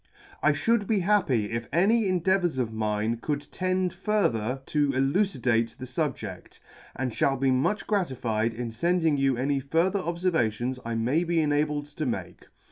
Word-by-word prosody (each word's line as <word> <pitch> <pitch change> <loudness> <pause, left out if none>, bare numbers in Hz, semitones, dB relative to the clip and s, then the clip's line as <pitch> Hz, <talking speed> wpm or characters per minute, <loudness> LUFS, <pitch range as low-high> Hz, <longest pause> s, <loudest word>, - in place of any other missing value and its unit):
" - - -24
I - - +4
fhould 230 -3 +1
be 210 -4 +2
happy 165 - +2
if 115 0 -3
any 205 +5 +3
endeavours 185 -3 +1
of 120 -3 -1
mine 110 +1 -1
could 145 +4 -2
tend 185 -1 0
further 135 - 0
to 145 -2 +1
elucidate 130 - +1
the 130 - -7
fubjedt, 130 0 -4 0.4
and 130 -1 -2
fhall 135 +3 +1
be 135 0 +2
much 135 +12 +1
gratified 120 - -1
in 120 -1 -4
fending 165 +3 +1
you 135 -2 +2
any 140 +2 0
further 165 +8 +1
obfervations 145 - -1
I 115 0 -3
may 125 +9 +1
be 170 -1 +1
enabled 150 -1 +1
to 155 - -1
make. 120 - -5
145 Hz, 160 wpm, -27 LUFS, 120-180 Hz, 0.4 s, I